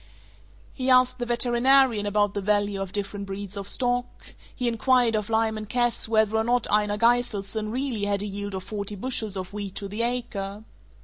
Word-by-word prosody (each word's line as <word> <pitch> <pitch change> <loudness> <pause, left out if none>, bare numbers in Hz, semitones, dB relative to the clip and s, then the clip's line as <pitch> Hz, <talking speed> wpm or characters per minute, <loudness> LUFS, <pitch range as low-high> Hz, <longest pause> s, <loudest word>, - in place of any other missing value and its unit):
He 260 -1 -2
asked 255 0 +4
the 240 - -3
veterinarian 240 -1 +3
about 205 0 +1
the 200 - -2
value 205 0 +1
of 195 -1 -4
different 200 0 -4
breeds 195 0 -6
of 200 0 -5
stock; 245 -1 -2 0.2
he 250 - -2
inquired 240 0 +2
of 210 0 -2
Lyman 220 -1 0
Cass 240 0 0
whether 220 -1 +2
or 220 - +2
not 240 0 +1
Einar 210 0 +2
Gyseldson 220 -2 +1
really 245 -3 -2
had 200 -1 0
had - - -4
a - - -3
yield 205 0 -5
of 190 - -5
forty 205 +1 -4
bushels 215 -2 -3
of 185 +1 -6
wheat 200 -2 -5
to 200 - -4
the 210 +3 -4
acre. 220 -4 -3
215 Hz, 190 wpm, -25 LUFS, 205-240 Hz, 0.2 s, asked